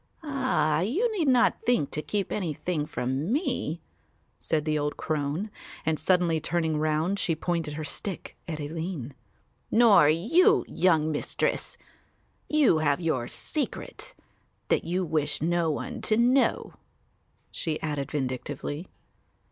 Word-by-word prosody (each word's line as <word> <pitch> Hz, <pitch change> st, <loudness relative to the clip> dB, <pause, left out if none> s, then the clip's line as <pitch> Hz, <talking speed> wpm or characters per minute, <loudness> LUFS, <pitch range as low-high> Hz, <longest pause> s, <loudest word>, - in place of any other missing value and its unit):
"Ah, 260 Hz, -, +1 dB
you 325 Hz, -, +1 dB
need 330 Hz, -7 st, +1 dB
not 255 Hz, -2 st, +4 dB
think 240 Hz, -, +1 dB
to 155 Hz, -, -2 dB
keep 200 Hz, +4 st, -2 dB
anything 165 Hz, -4 st, -2 dB
from 130 Hz, -, -2 dB
me," 295 Hz, +8 st, -1 dB, 0.6 s
said 155 Hz, -2 st, -1 dB
the 155 Hz, -1 st, +1 dB
old 150 Hz, 0 st, -2 dB
crone; 155 Hz, +7 st, -2 dB, 0.3 s
and 155 Hz, -1 st, +1 dB
suddenly 175 Hz, -3 st, +2 dB
turning 160 Hz, -1 st, 0 dB
round, 155 Hz, +5 st, +1 dB
she 165 Hz, -, +1 dB
pointed 165 Hz, -2 st, -2 dB
her 155 Hz, -, -4 dB
stick 180 Hz, +6 st, -4 dB
at 160 Hz, -2 st, -4 dB
Aline, 155 Hz, -2 st, -4 dB, 0.6 s
"nor 215 Hz, -10 st, +6 dB
you, 220 Hz, -, +4 dB
young 160 Hz, -4 st, +2 dB
Mistress, 145 Hz, -, -1 dB, 0.7 s
you 290 Hz, -, +4 dB
have 145 Hz, -2 st, +2 dB
your 145 Hz, -8 st, -1 dB
secret -, -, -4 dB, 0.5 s
that -, -, +2 dB
you 180 Hz, +2 st, 0 dB
wish 155 Hz, -3 st, 0 dB
no 170 Hz, 0 st, +1 dB
one 240 Hz, -, -4 dB
to 215 Hz, -, +1 dB
know," 250 Hz, +3 st, +2 dB, 0.8 s
she 155 Hz, -2 st, -3 dB
added 145 Hz, -2 st, -2 dB
vindictively. 145 Hz, +4 st, -3 dB
160 Hz, 130 wpm, -27 LUFS, 150-200 Hz, 0.8 s, nor